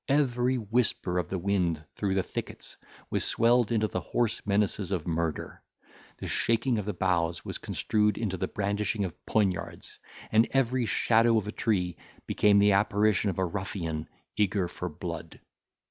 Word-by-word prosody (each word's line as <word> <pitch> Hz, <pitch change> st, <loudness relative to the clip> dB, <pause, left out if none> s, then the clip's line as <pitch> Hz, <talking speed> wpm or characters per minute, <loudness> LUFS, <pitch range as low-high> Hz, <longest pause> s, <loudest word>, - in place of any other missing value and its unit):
Every 130 Hz, -3 st, +2 dB
whisper 110 Hz, -5 st, 0 dB
of 85 Hz, -, -3 dB
the 95 Hz, -, -2 dB
wind 85 Hz, -4 st, 0 dB
through 100 Hz, -2 st, -1 dB
the 95 Hz, -, +2 dB
thickets -, -, -7 dB, 0.4 s
was -, -, 0 dB
swelled 120 Hz, 0 st, +3 dB
into 110 Hz, -2 st, +2 dB
the -, -, -3 dB
hoarse 115 Hz, -2 st, -1 dB
menaces 100 Hz, -1 st, +1 dB
of 90 Hz, -5 st, -1 dB
murder, 85 Hz, -1 st, -2 dB, 0.6 s
the -, -, -6 dB
shaking 115 Hz, +1 st, +1 dB
of 105 Hz, -, -4 dB
the 105 Hz, -, -2 dB
boughs 85 Hz, -2 st, 0 dB
was -, -, -4 dB
construed 105 Hz, -1 st, 0 dB
into 105 Hz, -5 st, -2 dB
the 90 Hz, -, -2 dB
brandishing 105 Hz, +1 st, -1 dB
of 90 Hz, -, -8 dB
poniards, 100 Hz, -5 st, -1 dB, 0.3 s
and 110 Hz, +1 st, +5 dB
every 130 Hz, -2 st, +1 dB
shadow 115 Hz, +1 st, +3 dB
of 105 Hz, -2 st, -1 dB
a -, -, -2 dB
tree 95 Hz, -7 st, 0 dB, 0.3 s
became 105 Hz, -1 st, +3 dB
the 100 Hz, 0 st, +5 dB
apparition 105 Hz, 0 st, +2 dB
of 90 Hz, -, -3 dB
a 95 Hz, -, +1 dB
ruffian 85 Hz, -4 st, -4 dB, 0.3 s
eager 100 Hz, -3 st, +1 dB
for 90 Hz, +1 st, -5 dB
blood. 75 Hz, -, -7 dB
100 Hz, 160 wpm, -28 LUFS, 90-110 Hz, 0.6 s, and